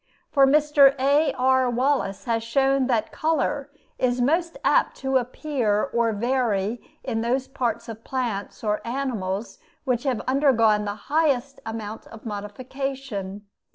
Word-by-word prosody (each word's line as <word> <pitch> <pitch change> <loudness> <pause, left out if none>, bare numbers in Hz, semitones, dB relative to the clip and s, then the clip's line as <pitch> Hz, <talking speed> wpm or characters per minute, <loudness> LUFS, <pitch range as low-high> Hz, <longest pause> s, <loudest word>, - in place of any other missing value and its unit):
For 275 -2 +5
Mr. 290 -1 +5
A.R. 265 -2 +3
Wallace 245 -6 0
has 230 -1 0
shown 270 +2 +2
that 225 -4 0
color 300 -3 -1 0.3
is 250 -1 +1
most 330 +7 +1
apt - - +3
to 265 0 +1
appear 250 -4 -1
or 235 -1 +2
to 210 - -5
vary 235 -2 0 0.2
in 225 -3 -2
those 255 +3 0
parts 235 -3 -2
of 225 -1 -8
plants 235 -7 -3
or 210 -1 0
animals 230 - -3 0.3
which 250 -3 +1
have 255 -4 0
undergone 230 -6 +3
the 205 0 -3 0.2
highest 280 -4 +1
amount 220 -1 -6
of 225 +1 -13
modification. 210 -1 -5
250 Hz, 135 wpm, -24 LUFS, 220-275 Hz, 0.3 s, For